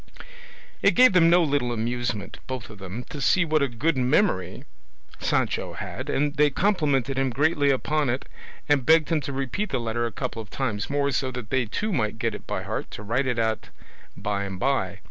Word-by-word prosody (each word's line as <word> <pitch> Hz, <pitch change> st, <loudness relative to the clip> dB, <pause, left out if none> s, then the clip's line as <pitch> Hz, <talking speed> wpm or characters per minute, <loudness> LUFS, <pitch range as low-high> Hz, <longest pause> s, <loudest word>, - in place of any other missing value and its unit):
It -, -, +4 dB
gave 255 Hz, -4 st, +7 dB
them 165 Hz, -2 st, +6 dB
no 175 Hz, +1 st, +5 dB
little 140 Hz, -5 st, 0 dB
amusement, 120 Hz, -2 st, -3 dB
both 130 Hz, -4 st, -5 dB
of 105 Hz, -, -12 dB
them, 100 Hz, +5 st, -6 dB
to 145 Hz, -, -6 dB
see 175 Hz, +6 st, +3 dB
what 155 Hz, -1 st, +2 dB
a 140 Hz, -, +3 dB
good 135 Hz, +7 st, 0 dB
memory 130 Hz, -, +1 dB, 0.6 s
Sancho -, -, 0 dB
had, -, -, -6 dB
and 145 Hz, +1 st, +1 dB
they 150 Hz, 0 st, +5 dB
complimented 140 Hz, -, +1 dB
him 135 Hz, -1 st, +1 dB
greatly 145 Hz, +3 st, +2 dB
upon 145 Hz, +1 st, +1 dB
it, 125 Hz, +3 st, -2 dB, 0.4 s
and 145 Hz, -3 st, +3 dB
begged 160 Hz, +2 st, +4 dB
him 160 Hz, -3 st, +1 dB
to 140 Hz, -, -5 dB
repeat 135 Hz, +10 st, -2 dB
the 130 Hz, -, -1 dB
letter 120 Hz, 0 st, -1 dB
a -, -, -6 dB
couple 105 Hz, +2 st, -4 dB
of 105 Hz, -, -12 dB
times 110 Hz, -7 st, -2 dB
more, 140 Hz, 0 st, +1 dB
so 130 Hz, +1 st, 0 dB
that 125 Hz, -4 st, -7 dB
they 130 Hz, -2 st, +2 dB
too 210 Hz, -, -2 dB
might 110 Hz, -7 st, 0 dB
get 115 Hz, -1 st, -1 dB
it -, -, -9 dB
by -, -, -3 dB
heart -, -, -4 dB
to 105 Hz, -, -8 dB
write 125 Hz, +6 st, 0 dB
it 125 Hz, -2 st, 0 dB
out 110 Hz, -1 st, -1 dB, 0.5 s
by 100 Hz, 0 st, -2 dB
and 95 Hz, -2 st, -6 dB
by. 130 Hz, -7 st, 0 dB
130 Hz, 205 wpm, -25 LUFS, 115-150 Hz, 0.6 s, gave